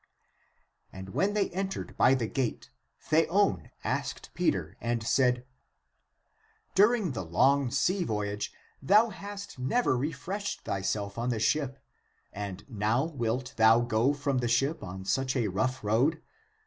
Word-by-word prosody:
And 95 0 -9
when 195 - 0
they 205 -2 +1
entered 190 +2 -4
by 130 - +5
the 120 -3 -1
gate 120 +1 -3 0.3
Theon 160 - +2
asked - - -3
Pe - - +2
ter - - -3
and 115 -1 -1
said, 125 0 +2 0.6
" 440 0 -40
During 210 -3 +4
the 110 -7 -4
long 130 +11 +3
sea 180 +9 +1
voyage 105 -5 -2 0.3
thou 210 +11 +5
hast 200 -5 -8
never 130 - +1
refreshed 185 +9 -3
thyself 100 +2 -2
on 120 +1 -1
the 120 - 0
ship, 135 +2 0 0.6
and 100 -1 -6
now 110 +1 +1
wilt 130 -4 -2
thou 110 +1 +6
go 120 +2 +2
from 140 -2 -1
the 120 - 0
ship 135 +7 +1
on 95 +1 -7
such 130 +5 0
a 115 -5 +1
rough 130 +7 -1
road 125 +10 +2
130 Hz, 145 wpm, -29 LUFS, 110-165 Hz, 0.6 s, thou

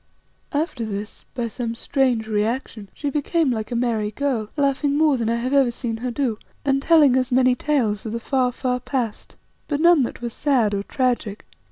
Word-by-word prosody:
After 290 -5 -1
this, 210 -1 -6
by 240 -2 -1
some 230 +1 -4
strange 245 -3 0
reaction, 215 0 -2
she 290 -2 -4
became 300 +1 +1
like 220 -2 -3
a - - -1
merry 230 -3 0
girl, 230 -2 -2
laughing 280 0 +1
more 305 -2 +4
than 230 -3 -1
I 230 - +1
have 250 +3 -2
ever 275 -3 +5
seen 235 -1 -3
her 250 +2 -3
do, 240 -3 -1 0.3
and 275 -1 +2
telling 295 -4 +5
us 255 0 +1
many 255 0 +4
tales 250 -7 0
of - - -4
the 230 - -3
far, 255 +1 +1
far 250 0 -2
past, 245 -4 -4 0.3
but 290 -2 -1
none 340 -2 +6
that 240 - -3
were 240 - -3
sad 240 -4 +1
or 200 - 0
tragic. 240 -3 -1
250 Hz, 195 wpm, -22 LUFS, 225-280 Hz, 0.3 s, none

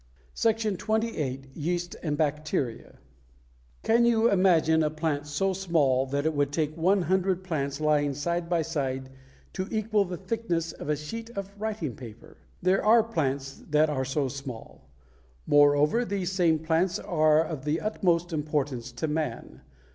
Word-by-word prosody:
SECTION 220 -4 0
XXVIII. 150 - -2
YEAST 175 +3 -3
AND 150 -3 -2
BACTERIA 150 -5 -2 0.9
Can 235 +1 +4
you 235 -1 +4
imagine 170 -4 +4
a 155 - +2
plant 155 -2 -2
so 190 +7 0
small 150 -9 +1
that 140 +2 -2
it 160 - +1
would 145 -1 0
take 155 0 -1
one 185 +3 +2
hundred 185 0 +1
plants 140 -5 -2
lying 145 -2 +2
side 170 +4 -2
by 170 -2 +1
side 135 -4 -3 0.4
to 185 0 -3
equal 215 -1 +1
the 180 -1 -5
thickness 185 -5 -2
of 150 - -8
a 150 - +2
sheet 225 +11 -7
of 200 0 -5
writing 205 - -3
paper? 115 -3 -12 0.3
There 185 +2 +3
are 225 +2 +6
plants 140 -10 -2
that 150 +1 +3
are 130 -3 -1
so 135 +1 0
small. 130 - -9 0.6
Moreover, 145 +9 +4
these 195 -5 -2
same 175 -4 +3
plants 165 +3 +1
are 155 -5 +3
of 155 -4 -6
the 150 +2 0
utmost 175 -5 0
importance 145 -5 -2
to 120 +6 -3
man. 155 0 -4
160 Hz, 155 wpm, -27 LUFS, 145-190 Hz, 0.9 s, are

